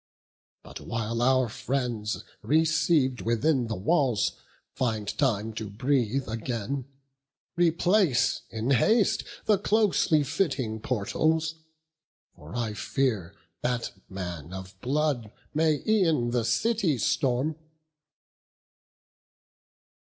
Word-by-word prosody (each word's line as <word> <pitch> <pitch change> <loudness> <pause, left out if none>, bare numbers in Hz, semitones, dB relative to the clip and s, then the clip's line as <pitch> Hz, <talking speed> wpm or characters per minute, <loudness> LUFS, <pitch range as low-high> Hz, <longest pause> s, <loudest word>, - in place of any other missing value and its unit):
But - - -9
while 115 +1 -3
our 130 0 +3
friends, 120 -3 -2 0.2
receiv'd 155 -1 +2
within 120 +3 +1
the 110 - -2
walls, 125 - +2 0.4
Find 110 -5 -1
time 110 -5 0
to 110 -1 -5
breathe 125 +3 0
again, 115 +3 -3 0.7
replace 175 - +3
in 115 +4 -2
haste 210 - +3 0.2
The 210 -3 +3
closely 200 -7 +3
fitting 130 - -1
portals; 155 +8 0 0.8
for 75 +7 -11
I 115 -3 -1
fear 105 -5 -1 0.3
That 125 -1 -1 0.2
man 90 -3 -6
of 95 0 -7
blood 135 -5 0 0.2
may 155 -1 +2
e'en 165 - +2
the 120 -2 0
city 175 - +1
storm." 140 +2 +1
125 Hz, 95 wpm, -27 LUFS, 110-155 Hz, 0.8 s, our